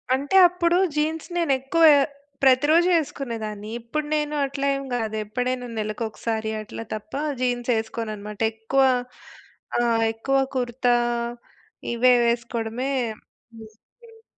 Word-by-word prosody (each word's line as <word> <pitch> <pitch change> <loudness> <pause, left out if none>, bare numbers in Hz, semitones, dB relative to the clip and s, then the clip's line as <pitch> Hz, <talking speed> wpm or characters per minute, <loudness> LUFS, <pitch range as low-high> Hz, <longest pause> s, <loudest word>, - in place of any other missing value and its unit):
అంటే 280 +7 -2
అప్పుడూ 345 0 +1 0.2
జీన్స్ 315 +2 -1
నేను 335 -4 +1
ఎక్కువ 270 +6 +1 0.6
ప్రతిరోజు 290 +6 +5
ఏసుకునేదాన్ని. 225 -8 -5
ఇప్పుడు 265 +6 -4
నేను 300 0 -1
అట్లా 275 0 -4
ఏం 275 - -4
గాదు. 220 -2 -2
ఎప్పుడైనా 250 +3 -2
నెలకొకసారి 220 0 -3
అట్లా 215 +1 -8
తప్ప 215 0 -8 0.3
జీన్స్ 245 -1 -1
ఏసుకోను 220 0 -4
అనమాట. 210 0 -9
ఎక్కువ 225 +5 +1 1.0
ఆ! - - +3 0.3
ఎక్కువ 270 +5 0 0.2
కుర్తా 245 -1 +1 1.0
ఇవే 250 +2 +5
వేసుకోవడమే 235 +2 -2 0.8
ఇష్టం. 450 - -22
245 Hz, 110 wpm, -24 LUFS, 225-285 Hz, 1.0 s, ప్రతిరోజు